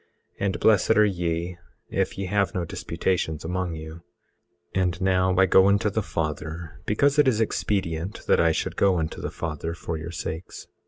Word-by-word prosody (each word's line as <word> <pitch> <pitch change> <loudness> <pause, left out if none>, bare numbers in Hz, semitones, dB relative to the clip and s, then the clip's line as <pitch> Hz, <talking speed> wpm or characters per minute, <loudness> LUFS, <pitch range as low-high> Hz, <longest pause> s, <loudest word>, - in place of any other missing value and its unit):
And 100 -2 -1
blessed 110 +1 +4
are 105 - +7
ye 85 -2 -2 0.3
if - - -1
ye 100 - -2
have 100 +1 0
no 90 -2 -1
disputations 80 -3 -2
among 90 0 -2
you. 80 +1 -8 0.7
18:35 95 - +3
And 90 -1 -1
now 95 -1 +2
I 95 - +6
go 95 0 +6
unto 100 +1 +3
the 110 - 0
Father, 80 -1 -4
because 140 +7 +3
it 145 - +5
is 115 -4 +3
expedient 95 -5 -1
that - - +3
I 85 -1 +4
should - - -2
go 95 -2 +3
unto 80 -1 -3
the - - -3
Father 80 +1 -4
for 85 -1 -4
your 80 +1 -6
sakes. 85 0 -6
90 Hz, 180 wpm, -25 LUFS, 80-100 Hz, 0.7 s, are